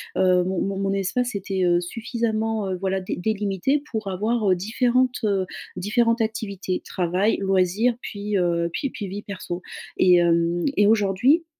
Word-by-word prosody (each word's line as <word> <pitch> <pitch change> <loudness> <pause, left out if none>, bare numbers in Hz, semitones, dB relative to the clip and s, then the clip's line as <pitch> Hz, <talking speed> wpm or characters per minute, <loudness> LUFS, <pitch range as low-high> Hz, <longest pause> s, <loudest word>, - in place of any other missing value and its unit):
heu, 185 -1 +4
mon 185 0 -1
mon 195 0 -2
mon 195 0 0
espace 240 +6 -1
était, 195 -1 -2
heu, 175 0 +3
suffisamment, 225 +1 -2
heu, 185 - -2
voilà 190 +1 -1
dé 185 - -4
délimité 210 +7 0
pour 220 -4 -3
avoir, 215 +4 0
heu, 185 - +4
différentes, 245 +6 +1
heu, 195 -3 +1 0.3
différentes 230 +5 +1
activités, 200 -4 -3
travail, 185 +4 0
loisirs 195 +5 +2
puis, 205 -3 -3
heu, 170 -1 +1
puis 275 - -2
puis 205 - -5
vie 200 +2 -5
perso. 185 -3 -6 0.4
Et 180 -1 +6
hem 170 0 +2
et 205 - +4
aujourd'hui, 220 - +3
195 Hz, 160 wpm, -23 LUFS, 185-225 Hz, 0.4 s, Et